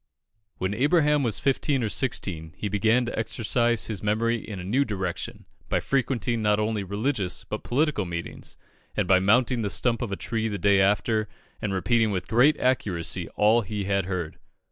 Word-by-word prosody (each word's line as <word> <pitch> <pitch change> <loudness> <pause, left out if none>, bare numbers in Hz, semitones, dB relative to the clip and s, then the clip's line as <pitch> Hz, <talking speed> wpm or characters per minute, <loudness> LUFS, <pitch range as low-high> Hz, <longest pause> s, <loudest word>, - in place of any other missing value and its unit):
When 95 +2 -1
Abraham 150 +4 +3
was 115 -7 0
fifteen 135 -1 +1
or 110 - 0
sixteen, 85 - -3
he 105 - -3
began 110 +5 +2
to 120 - -3
exercise 120 +1 0
his 110 -4 -4
memory 115 +3 +1
in 105 -3 -7
a - - -6
new 120 +10 +2
direction, 100 0 -4 0.2
by - - +2
frequenting 120 -4 0
not 105 0 +2
only 105 -1 -1
religious 100 0 -2
but 105 - -5
political 140 -5 0
meetings, 85 -1 -6 0.4
and - - +1
by 95 0 +5
mounting 115 +5 +3
the 105 - -1
stump 120 +4 +2
of 120 -5 -3
a - - -1
tree 115 +2 -2
the 105 -2 -3
day 100 0 +4
after 105 +2 +2 0.3
and 105 - -2
repeating 110 +4 +2
with 95 -3 -3
great 125 +7 +4
accuracy 100 -10 -1
all 110 +3 +4
he 105 -1 -4
had 100 -1 0
heard. 90 -4 -4
110 Hz, 180 wpm, -26 LUFS, 100-120 Hz, 0.4 s, by